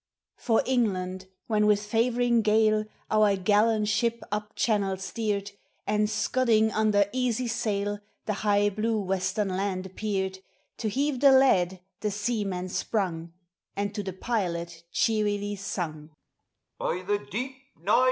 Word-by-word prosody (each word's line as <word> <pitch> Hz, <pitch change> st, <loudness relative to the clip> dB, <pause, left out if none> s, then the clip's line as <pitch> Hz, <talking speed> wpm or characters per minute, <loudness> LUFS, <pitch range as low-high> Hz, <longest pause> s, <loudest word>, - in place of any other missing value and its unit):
For 225 Hz, -3 st, +2 dB
England 190 Hz, -7 st, 0 dB, 0.2 s
when 210 Hz, -2 st, +2 dB
with 210 Hz, 0 st, +3 dB
favoring 235 Hz, +2 st, +2 dB
gale 215 Hz, 0 st, +3 dB, 0.3 s
Our 215 Hz, -2 st, +4 dB
gallant 210 Hz, +3 st, +2 dB
ship 235 Hz, +3 st, 0 dB
up 210 Hz, +1 st, -3 dB
channel 200 Hz, -4 st, +1 dB
steered, 200 Hz, +1 st, -2 dB, 0.3 s
And, 210 Hz, 0 st, +1 dB
scudding 220 Hz, -1 st, +2 dB
under 210 Hz, -2 st, +3 dB
easy 250 Hz, -1 st, 0 dB
sail, 205 Hz, -2 st, -1 dB, 0.3 s
The 215 Hz, -, 0 dB
high 205 Hz, -1 st, +3 dB
blue 215 Hz, +2 st, 0 dB
western 190 Hz, +1 st, -1 dB
land 190 Hz, 0 st, -2 dB
appeared; 190 Hz, -1 st, -3 dB, 0.4 s
To 220 Hz, -, -1 dB
heave 275 Hz, +4 st, 0 dB
the 275 Hz, 0 st, +7 dB
lead 190 Hz, -9 st, +4 dB, 0.2 s
the 210 Hz, -, -1 dB
sen 205 Hz, 0 st, -1 dB
man 180 Hz, 0 st, -4 dB
sprung, 170 Hz, -5 st, -2 dB, 0.4 s
And 200 Hz, +1 st, -2 dB
to 210 Hz, -, -3 dB
the 190 Hz, -2 st, -5 dB
pilot 170 Hz, -6 st, -3 dB
cheerly 205 Hz, -2 st, +1 dB
sung, 160 Hz, -6 st, -5 dB, 0.4 s
" -, -, -56 dB
By 180 Hz, +2 st, -2 dB
the 205 Hz, +2 st, 0 dB
deep 255 Hz, +6 st, -5 dB
— -, -, -45 dB
nine! 205 Hz, +8 st, +3 dB
210 Hz, 140 wpm, -27 LUFS, 190-220 Hz, 0.4 s, the